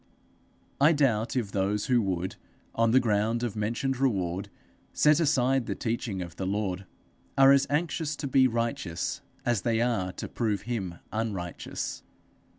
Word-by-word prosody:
I 150 Hz, +4 st, +6 dB
doubt 120 Hz, -7 st, +1 dB
if 115 Hz, -6 st, -1 dB
those 100 Hz, +1 st, 0 dB
who 125 Hz, -3 st, +3 dB
would, 95 Hz, -2 st, -2 dB, 0.4 s
on 115 Hz, 0 st, +2 dB
the 125 Hz, +3 st, +6 dB
ground 110 Hz, 0 st, +1 dB
of 115 Hz, -4 st, -2 dB
mentioned 120 Hz, +5 st, -1 dB
reward, 95 Hz, -8 st, 0 dB, 0.4 s
set 150 Hz, +1 st, +4 dB
aside 135 Hz, -5 st, +2 dB
the -, -, -2 dB
teaching 110 Hz, -5 st, -2 dB
of 85 Hz, -1 st, -10 dB
the 95 Hz, -, -2 dB
Lord, 95 Hz, -2 st, -2 dB, 0.5 s
are 135 Hz, 0 st, +8 dB
as 140 Hz, 0 st, +4 dB
anxious 155 Hz, 0 st, -1 dB
to 145 Hz, -, -4 dB
be 130 Hz, 0 st, +5 dB
righteous 115 Hz, -8 st, -2 dB, 0.2 s
as 120 Hz, -5 st, +1 dB
they 115 Hz, +1 st, +1 dB
are 115 Hz, -6 st, 0 dB
to -, -, -6 dB
prove 105 Hz, -5 st, -1 dB
him 100 Hz, -8 st, -3 dB, 0.2 s
unrighteous. 100 Hz, -6 st, -4 dB
115 Hz, 155 wpm, -28 LUFS, 100-130 Hz, 0.5 s, are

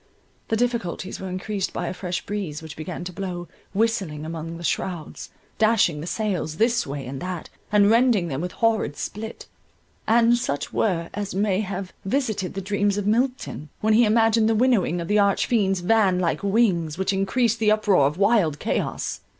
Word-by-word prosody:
The 225 Hz, -, +1 dB
difficulties 225 Hz, -6 st, -2 dB
were 190 Hz, -, -5 dB
increased 190 Hz, +2 st, -3 dB
by -, -, -3 dB
a -, -, -3 dB
fresh 180 Hz, -1 st, -4 dB
breeze 185 Hz, -7 st, -4 dB
which 155 Hz, -2 st, -8 dB
began 165 Hz, +2 st, -6 dB
to 180 Hz, 0 st, -6 dB
blow, 180 Hz, -2 st, -5 dB, 0.2 s
whistling 195 Hz, -8 st, -1 dB
among 165 Hz, +1 st, -5 dB
the 170 Hz, -, -9 dB
shrowds, 170 Hz, -1 st, -3 dB, 0.3 s
dashing 215 Hz, -9 st, +3 dB
the 165 Hz, -, -6 dB
sails 185 Hz, -7 st, -2 dB
this 235 Hz, -1 st, +2 dB
way 140 Hz, -1 st, -5 dB
and 130 Hz, +2 st, -6 dB
that, 180 Hz, -2 st, -5 dB, 0.2 s
and 205 Hz, -1 st, +5 dB
rending 230 Hz, -6 st, +4 dB
them 140 Hz, -2 st, -3 dB
with 180 Hz, +1 st, -4 dB
horrid 220 Hz, -10 st, +1 dB
split, 220 Hz, +3 st, -6 dB, 0.6 s
and 235 Hz, +1 st, +5 dB
such 145 Hz, -10 st, -3 dB
whir 170 Hz, -6 st, 0 dB
as 205 Hz, -2 st, -4 dB
may 200 Hz, -1 st, +1 dB
have 195 Hz, -2 st, -5 dB
visited 215 Hz, -5 st, -1 dB
the 195 Hz, -, -3 dB
dreams 205 Hz, +1 st, 0 dB
of 205 Hz, -, -2 dB
Milton, 235 Hz, -, -1 dB
when 220 Hz, 0 st, +3 dB
he 230 Hz, +3 st, +6 dB
imagined 225 Hz, 0 st, +3 dB
the 225 Hz, -, +2 dB
winnowing 215 Hz, -8 st, +2 dB
of 170 Hz, -, -4 dB
the 210 Hz, +2 st, +3 dB
arch 200 Hz, -1 st, +3 dB
fiend's 195 Hz, -6 st, +1 dB
van 195 Hz, -1 st, +3 dB
like 175 Hz, -2 st, 0 dB
wings, 195 Hz, -7 st, +1 dB
which 190 Hz, +1 st, 0 dB
encreased 225 Hz, +4 st, +1 dB
the 215 Hz, -1 st, +3 dB
uproar 210 Hz, -9 st, +4 dB
of 150 Hz, +3 st, -4 dB
wild 200 Hz, -7 st, +3 dB
chaos. -, -, -2 dB
195 Hz, 185 wpm, -24 LUFS, 175-220 Hz, 0.6 s, he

